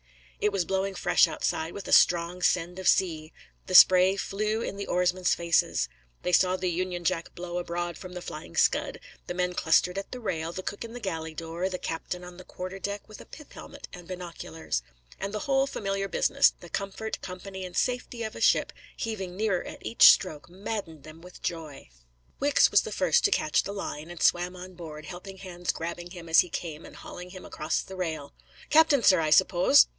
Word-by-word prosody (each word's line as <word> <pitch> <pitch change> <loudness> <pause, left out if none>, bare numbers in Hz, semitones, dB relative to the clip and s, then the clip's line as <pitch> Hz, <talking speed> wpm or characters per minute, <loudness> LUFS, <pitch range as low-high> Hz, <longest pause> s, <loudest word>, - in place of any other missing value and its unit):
It 210 - +2
was 195 -3 0
blowing 195 +1 -1
fresh - - +4
outside, 160 +1 -2
with 200 - -7
a - - -5
strong 175 +1 +4
send 180 0 +1
of 190 - -3
sea. 160 -4 +2 0.4
The 185 - -1
spray 185 +1 +8
flew 215 +3 -2
in - - -4
the 200 0 -5
oarsmen's 180 0 +1
faces. 170 - +1 0.4
They 180 - 0
saw 180 +1 +4
the 185 -1 -1
Union 180 0 -3
Jack 165 0 -2
blow 175 0 -4
abroad 175 0 -3
from 185 -1 -9
the 180 -1 -7
Flying 150 - -8
Scud, - - +2 0.3
the 175 - -4
men 180 0 0
clustered 180 +2 +2
at 195 - -8
the 255 - -6
rail, 165 -8 -3
the 185 +2 -6
cook 205 - -5
in 230 0 -8
the 245 - -6
galley 160 -7 -4
door, 165 +3 -3
the 185 - -3
captain 180 +1 -5
on 180 0 -10
the 185 - -10
quarter 185 +2 -7
deck 200 +1 -5
with 215 - -11
a - - -12
pith 300 - -13
helmet - - -10
and 175 -2 -10
binoculars. 170 - -5 0.4
And 195 +1 -3
the 210 - -3
whole 270 -1 +2
familiar 195 -5 -2
business, - - +3
the 175 - -12
comfort, 200 +4 -4
company, 190 +1 -7
and 180 -1 -7
safety 245 -2 -1
of 220 0 -5
a - - -8
ship, - - +3 0.2
heaving 195 -5 -4
nearer 205 -4 0
at - - -10
each 230 - +8
stroke, 155 -5 +2
maddened 180 -5 -6
them 155 +2 -12
with 180 +1 -14
joy. 160 - -5 0.5
Wicks 285 +1 +4
was - - +6
the - - -6
first 480 - +2
to - - +5
catch 155 - +2
the 200 - -6
line, 160 -5 -5
and 175 -1 -5
swarm 175 +1 +2
on 185 +1 -9
board, 155 -3 -9
helping 190 +3 -9
hands 180 -2 -3
grabbing 170 +1 -6
him 175 -2 -10
as 165 - +6
he 180 - +3
came 160 -2 -5
and - - -14
hauling 180 0 -9
him 185 0 -10
across 155 - -2
the 190 - -10
rail. 160 -6 -4 0.4
"Captain, 300 -4 +5
sir, 185 -3 +6
I 155 -1 +1
suppose?" 180 - +6
180 Hz, 210 wpm, -27 LUFS, 170-195 Hz, 0.5 s, spray